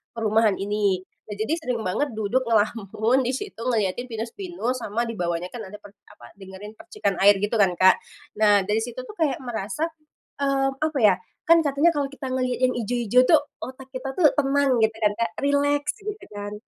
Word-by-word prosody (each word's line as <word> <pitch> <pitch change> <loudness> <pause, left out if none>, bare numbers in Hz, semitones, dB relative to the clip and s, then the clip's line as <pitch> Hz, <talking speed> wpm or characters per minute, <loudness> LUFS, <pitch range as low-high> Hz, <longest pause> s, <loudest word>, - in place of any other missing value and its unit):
perumahan 220 -2 +2
ini. 200 -2 0 0.2
Nah, 210 - -6
jadi 220 +8 -2
sering 250 -7 -3
banget 225 +7 -1
duduk 230 +4 -1
ngelamun 220 +2 +1
di 255 0 -1
situ 410 +9 -7
ngeliatin 230 0 0
pinus-pinus 250 - -4
sama 230 0 -2
di 230 - -4
bawahnya 175 +1 -2
kan 245 - -7
ada 200 - -10
per 205 -1 -13 0.2
apa, 120 0 -16
dengerin 195 +2 -10
percikan 335 - -3
air 200 +1 +7
gitu 210 +2 0
kan, 195 -3 +4
Kak. 185 +1 +5 0.4
Nah 205 -2 +5
dari 210 +3 -1
situ 245 - -4
tuh 430 -3 -12
kayak 295 -6 0
merasa, 240 +6 -3 0.5
mmm, 270 -1 0
apa 310 -3 -1
ya, 205 -4 +5 0.3
kan 335 0 +7
katanya 285 +4 +3
kalau 285 -3 -1
kita 275 -1 -7
ngelihat 255 -1 -1
yang - - -2
hijau-hijau 240 +1 +2
tuh 315 -3 +6 0.2
otak 260 +1 -9
kita 265 +1 -5
tuh 325 -5 +6
tenang 275 -2 +2
gitu 220 - -3
kan 210 -2 +1
Kak, 230 - -1
rileks 285 +1 +1
gitu 420 +1 -6
kan, 205 0 -6
235 Hz, 185 wpm, -24 LUFS, 205-275 Hz, 0.5 s, air